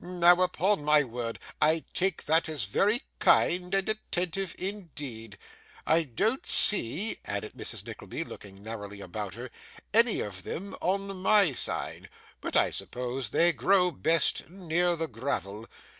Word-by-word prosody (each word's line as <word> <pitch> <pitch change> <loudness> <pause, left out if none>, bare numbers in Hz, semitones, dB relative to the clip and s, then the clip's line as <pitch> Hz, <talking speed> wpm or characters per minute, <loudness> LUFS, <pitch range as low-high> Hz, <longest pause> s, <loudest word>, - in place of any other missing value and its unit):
Now, 175 0 +4
upon 185 0 +1
my 150 0 +5
word, 115 -2 -5 0.2
I 160 +1 +3
take 190 -1 -1
that 160 +1 +3
as 150 -7 -3
very 210 - +1 0.2
kind 180 +1 +3
and 195 -1 0
attentive 190 -4 -3
indeed! 145 - -7 0.5
I 165 +1 +3
don't 190 - -1
see,' 200 - +4
added 100 +1 -5
Mrs. - - -5
Nickleby, - - -6
looking 100 0 -12
narrowly 105 -2 -7
about 100 +1 -6
her, 120 +2 -8 0.4
'any 230 +1 +4
of 95 -3 -6
them 195 - -6
on 195 +1 -2
my 195 -5 +5
side, - - -2 0.3
but - - -5
I - - +3
suppose 125 -1 -4
they 170 +6 +3
grow 185 -1 +2
best 165 -2 +1
near 175 -1 0
the 165 0 -3
gravel. 115 -4 -4
165 Hz, 145 wpm, -28 LUFS, 115-190 Hz, 0.5 s, my